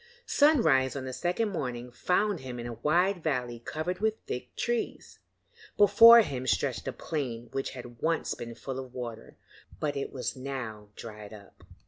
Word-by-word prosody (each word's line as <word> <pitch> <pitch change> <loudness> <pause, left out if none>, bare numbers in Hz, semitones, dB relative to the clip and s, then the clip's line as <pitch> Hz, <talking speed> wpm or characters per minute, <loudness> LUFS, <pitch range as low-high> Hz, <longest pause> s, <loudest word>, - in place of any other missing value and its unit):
Sunrise 160 - +4
on 135 -2 -4
the 130 - -5
second 180 - 0
morning 125 -9 -4
found 180 - +1
him 125 -2 -7
in 120 - -5
a 120 - -4
wide 175 - +1
valley 125 -6 -2
covered 160 +9 -4
with 220 +1 +1
thick 125 0 -6
trees. 240 -1 -3 0.6
Before 230 +3 +9
him 130 - -4
stretched - - 0
a - - 0
plain 120 -7 -4
which 135 - -2
had 120 -2 -10
once 165 +1 0
been 115 -1 -8
full 135 +1 -5
of 130 -1 -9
water, 115 -3 -7 0.4
but 145 -1 -1
it 140 - -3
was 130 - -4
now 125 -6 -6
dried 105 -2 -9
up. 100 -2 -16
130 Hz, 165 wpm, -29 LUFS, 120-175 Hz, 0.6 s, Before